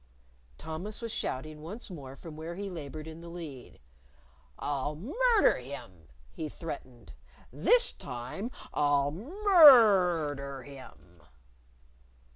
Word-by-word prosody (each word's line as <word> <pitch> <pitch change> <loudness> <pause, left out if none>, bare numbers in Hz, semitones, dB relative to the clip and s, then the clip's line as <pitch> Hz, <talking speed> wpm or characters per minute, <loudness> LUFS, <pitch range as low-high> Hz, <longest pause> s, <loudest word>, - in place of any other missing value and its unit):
Thomas 175 +7 -6
was 230 -1 -5
shouting 150 -5 -4
once 200 +7 -8
more 135 -6 -9
from 155 +3 -10
where 160 +2 -6
he 200 +1 -5
labored 155 -2 -7
in 160 +1 -9
the 170 - -10
lead. 155 - -9 0.8
"I'll 145 +1 -2
murder 420 - +3
him!" 95 - -10 0.2
he 155 -1 -5
threatened. 130 -7 -9 0.4
"This - - +4
time 125 - -6 0.2
I'll 145 -1 +2
mur 230 - +6
r - - -4
der 140 -1 -7
him!" 125 - -14
160 Hz, 115 wpm, -30 LUFS, 140-205 Hz, 0.8 s, mur